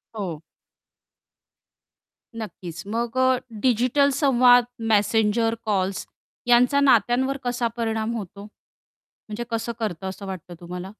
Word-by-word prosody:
हो. 180 -8 -5 2.0
नक्कीच 175 -5 -7
मग 235 +3 -3
अ, 260 0 +4 0.2
डिजिटल 255 +3 +3
संवाद 245 -3 +5 0.3
मेसेंजर, 220 +2 +2
कॉल्स 195 -2 -1 0.4
यांचा 245 +3 +4
नात्यांवर 260 +1 +3
कसा 245 -1 -1
परिणाम 225 0 -1
होतो? 200 0 -8
म्हणजे 215 +1 -12
कसं 230 +1 -2
करतं, 190 -4 -3
असं 190 +1 -8
वाटतं 180 -2 -7
तुम्हाला? 180 +2 -7
225 Hz, 105 wpm, -23 LUFS, 200-245 Hz, 2.0 s, संवाद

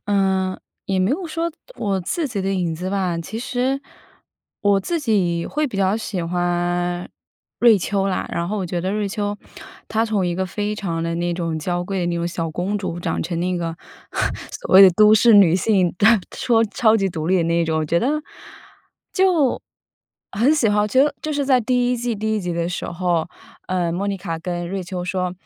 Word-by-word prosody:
嗯， 190 -2 +1 0.3
也 190 -1 0
没 185 +3 +2
有 340 +5 -1
说 330 +1 -2 0.3
我 195 -3 -1
自 300 - -2
己 205 -5 -3
的 195 +1 -1
影 175 -4 -1
子 180 +3 -4
吧， 185 -4 -1
其 190 +7 -6
实 260 +2 -1 0.8
我 200 -2 +3
自 335 - -2
己 185 - +1
会 300 +1 -1
比 225 -8 -6
较 195 +2 +2
喜 205 -5 -4
欢 175 0 -1 0.5
瑞 230 -4 +6
秋 195 +1 -1
啦。 185 - -1
然 170 +1 -2
后 210 0 -2
我 185 - -2
觉 175 0 -2
得 190 +3 -2
瑞 210 -1 -1
秋 205 0 -2 0.5
她 225 +1 +1
从 210 -5 0
一 175 - -1
个 190 +1 -1
非 210 +3 -3
常 170 -5 -3
地 165 0 -2
那 175 0 -1
种 165 -2 -2
娇 175 +3 -2
贵 195 0 -2
的 175 - -1
那 170 - -1
种 170 0 -1
小 165 -2 -3
公 185 +6 -2
主 175 -3 -4
长 - - -2
成 170 -2 -3
那 180 0 0
个 165 -1 -3 0.8
所 - - -2
谓 195 - +11
的 190 - +9
都 215 +4 +6
市 230 +2 +5
女 190 -5 +7
性， 190 -2 +2 0.4
说 230 -2 +2
超 220 +1 +3
级 195 -2 +1
独 160 -3 -4
立 185 +1 +3
的 170 - +2
那 170 0 +1
种。 160 -1 0
我 - - -1
觉 170 +3 +1
得， 295 - 0 0.9
就 360 -8 +2 0.7
很 245 +9 +3
喜 250 -8 +2
欢 210 - +2
我 210 - +1
觉 260 +5 +4
得 295 -1 +1
就 310 - -2
是 285 -1 0
在 260 -2 +4
第 245 +1 +1
1 - - 0
季 240 -1 -2
第 220 +1 -1
1 - - -1
集 175 -1 -3
的 170 0 -1
时 180 - -4
候， 175 -2 -1 0.4
呃， 180 -2 0
莫 195 +4 -2
妮 200 - -1
卡 170 -3 -5
跟 175 0 -4
瑞 195 0 -3
秋 180 0 -5
说： 180 0 -2
190 Hz, 225 characters per minute, -21 LUFS, 175-220 Hz, 0.9 s, 谓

